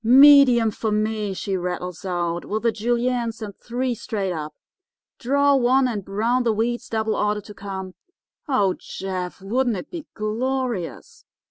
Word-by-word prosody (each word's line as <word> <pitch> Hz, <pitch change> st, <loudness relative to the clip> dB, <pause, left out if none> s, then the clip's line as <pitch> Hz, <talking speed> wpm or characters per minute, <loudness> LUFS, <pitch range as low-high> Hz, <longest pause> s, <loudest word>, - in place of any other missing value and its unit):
"'Medium 255 Hz, -2 st, +7 dB
for 220 Hz, +2 st, -3 dB
me,' 215 Hz, -1 st, 0 dB
she 195 Hz, +1 st, -2 dB
rattles 180 Hz, -2 st, -4 dB
out, 175 Hz, -2 st, -1 dB
'with 215 Hz, +2 st, -3 dB
the 230 Hz, -, +3 dB
Juliennes, 235 Hz, +1 st, -1 dB
and 205 Hz, -3 st, -7 dB
three, 250 Hz, +1 st, -2 dB
straight 200 Hz, -4 st, -3 dB
up. 155 Hz, -2 st, -6 dB, 0.6 s
Draw 280 Hz, +2 st, +3 dB
one, 260 Hz, +1 st, +3 dB
and 215 Hz, -5 st, -3 dB
brown 225 Hz, +6 st, 0 dB
the 235 Hz, -2 st, +2 dB
wheats, 240 Hz, +2 st, -1 dB
double 220 Hz, -1 st, 0 dB
order 210 Hz, 0 st, 0 dB
to 210 Hz, -, -12 dB
come. 190 Hz, -2 st, -6 dB, 0.5 s
Oh, 205 Hz, -10 st, +2 dB
Jeff, 185 Hz, -1 st, -5 dB
wouldn't 240 Hz, +2 st, 0 dB
it 180 Hz, -, -8 dB
be 335 Hz, -4 st, -7 dB
glorious! 235 Hz, -2 st, -3 dB
220 Hz, 150 wpm, -23 LUFS, 195-245 Hz, 0.6 s, Medium